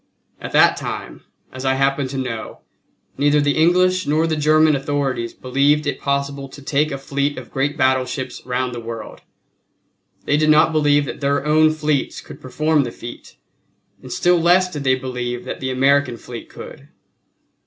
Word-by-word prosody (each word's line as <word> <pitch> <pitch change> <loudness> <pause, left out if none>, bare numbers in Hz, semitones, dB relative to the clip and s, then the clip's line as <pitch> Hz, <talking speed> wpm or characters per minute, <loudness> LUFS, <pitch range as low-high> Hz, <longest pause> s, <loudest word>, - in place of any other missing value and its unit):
At - - -7
that - - +5
time, - - -6 0.3
as 130 0 -7
I 130 0 +1
happen 135 0 +1
to 135 +1 -6
know, 125 -4 -5 0.6
neither 145 +1 +3
the 145 0 +1
English 180 +2 +3
nor 155 +2 +2
the 160 -1 0
German 155 0 +4
authorities 135 -4 -2
believed 140 +4 +1
it 140 -2 -2
possible 140 0 -2
to 140 - -12
take 150 +2 0
a 140 - -3
fleet 140 +1 -2
of - - -9
great 145 +2 -1
battleships 130 -1 -1
round 125 0 -2
the 120 - -5
world. 115 -1 -8 1.0
They 145 - +2
did 155 0 +2
not 155 +2 +5
believe 145 -2 +3
that - - -7
their 140 0 0
own 155 +1 +4
fleets 155 -3 -1
could - - -12
perform 155 +4 +1
the 120 - -5
feat, 120 +1 -10 0.7
and - - -11
still 175 0 +2
less 180 +2 +4
did 145 -4 -5
they 130 0 +4
believe 125 -1 -5
that - - -5
the 130 - -3
American 135 -1 +2
fleet - - -9
could. - - -11
140 Hz, 175 wpm, -20 LUFS, 130-155 Hz, 1.0 s, that